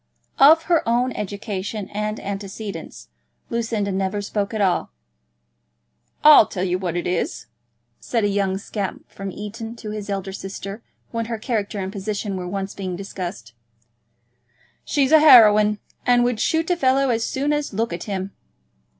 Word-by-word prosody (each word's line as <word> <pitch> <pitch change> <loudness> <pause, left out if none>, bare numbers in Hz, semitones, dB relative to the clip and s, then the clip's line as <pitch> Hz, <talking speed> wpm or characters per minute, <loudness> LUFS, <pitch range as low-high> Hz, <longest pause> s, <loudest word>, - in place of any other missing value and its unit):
Of 315 +4 +7
her 335 -2 +3
own 245 +2 +2
education 200 0 -4
and 210 +1 -3
antecedents, 195 - -7 0.4
Lucinda 225 -3 -1
never 190 +1 -1
spoke 205 0 -2
at 220 - -3
all. 190 -3 +1 1.3
"I'll 300 -7 +9
tell 185 - -4
you 180 -1 0
what 175 -3 -3
it 175 - -2
is," 175 -1 -2 0.5
said 230 -3 -1
a - - +3
young 195 -1 0
scamp 200 -1 -5
from 195 -1 -6
Eton 225 +3 -7
to 215 -2 -7
his 210 -1 -6
elder 195 -1 -3
sister, 195 +2 -7 0.3
when 230 -1 -2
her 230 0 -3
character 215 -2 -2
and 190 -1 -3
position 205 0 -3
were 180 -1 -4
once 195 +1 -4
being 185 -2 -4
discussed. 175 - -7 1.3
"She's 280 -1 +1
a 315 - +8
heroine, 215 -8 +7 0.3
and 245 -1 +4
would 245 -2 0
shoot 320 +7 +1
a - - +3
fellow 270 -4 +2
as 225 -1 0
soon 280 +5 -1
as 295 0 -2
look 225 -2 -1
at 170 - -5
him." 195 -1 -4
210 Hz, 160 wpm, -22 LUFS, 195-235 Hz, 1.3 s, I'll